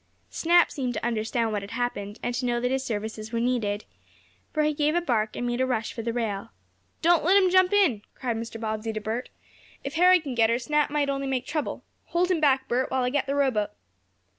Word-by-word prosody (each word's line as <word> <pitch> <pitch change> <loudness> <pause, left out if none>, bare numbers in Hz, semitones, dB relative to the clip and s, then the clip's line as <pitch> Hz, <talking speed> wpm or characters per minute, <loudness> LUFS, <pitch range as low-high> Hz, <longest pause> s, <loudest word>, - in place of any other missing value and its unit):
Snap 345 +1 +4
seemed 255 -3 -3
to - - -3
understand 230 0 0
what 205 -1 -1
had 200 - -8
happened, 225 -3 -3
and 245 - -1
to 245 +2 -2
know 240 0 +1
that 250 +1 -1
his 265 0 0
services 220 -1 -4
were 230 - -1
needed, 230 -4 -1 0.7
for 310 - +1
he 305 0 +2
gave 300 +2 +1
a - - +4
bark, 225 -9 0
and 245 - -3
made 240 +1 -1
a - - +3
rush 225 -4 -1
for 230 - -5
the 230 +1 -2
rail. 220 -4 -3 0.5
"Don't 340 -1 +4
let 370 +5 +5
him 375 -2 +4
jump 370 0 +5
in!" 365 - +3
cried 245 -3 -2
Mr. 230 0 -6
Bobbsey 220 0 -3
to 215 - -3
Bert. 220 +4 -4 0.5
"If 275 - -5
Harry 360 +2 +6
can 285 -5 -5
get 225 -2 +3
her, 230 - +2
Snap 295 +4 +1
might 290 -1 0
only 275 0 -2
make 260 -2 -1
trouble. 305 +1 -3 0.2
Hold 355 +2 +1
him 350 - +2
back, 270 -3 +3
Bert, 250 +2 0
while 260 -1 0
I 250 - 0
get 275 0 0
the 280 - -1
rowboat." 260 -7 +1
250 Hz, 235 wpm, -26 LUFS, 225-295 Hz, 0.7 s, Harry